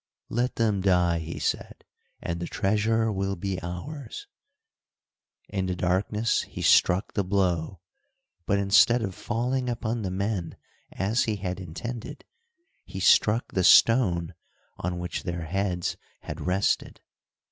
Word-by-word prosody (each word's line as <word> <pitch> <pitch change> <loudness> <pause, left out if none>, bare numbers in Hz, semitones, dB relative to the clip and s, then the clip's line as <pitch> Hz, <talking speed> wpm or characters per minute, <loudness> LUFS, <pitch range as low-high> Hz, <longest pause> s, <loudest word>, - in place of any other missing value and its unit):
"Let 120 +2 -1
them 105 -4 +1
die," 90 -3 +3
he 80 +1 -6
said, - - -3 0.4
"and 85 0 -3
the 85 - -4
treasure 110 +3 +1
will 95 0 -2
be 95 0 -3
ours." 115 - -7 1.2
In 95 -2 -2
the 90 - -1
darkness 100 +5 +1
he - - -7
struck 90 +2 +4
the 100 - 0
blow, 90 -2 0 0.7
but 100 - +2
instead 100 +4 +4
of 95 -3 -3
falling 125 +5 -2
upon 115 -1 -2
the 95 - -2
men, 95 -2 -3 0.3
as 105 +6 0
he 110 - -1
had 95 -2 -4
intended, 100 +7 -7 0.6
he 95 - -8
struck 105 +5 +4
the 95 - 0
stone 90 -7 +5 0.4
on 90 0 -3
which 90 -2 -4
their 85 -3 -4
heads 90 0 -2 0.2
had - - -7
rested. 95 +3 0
95 Hz, 135 wpm, -26 LUFS, 90-110 Hz, 1.2 s, stone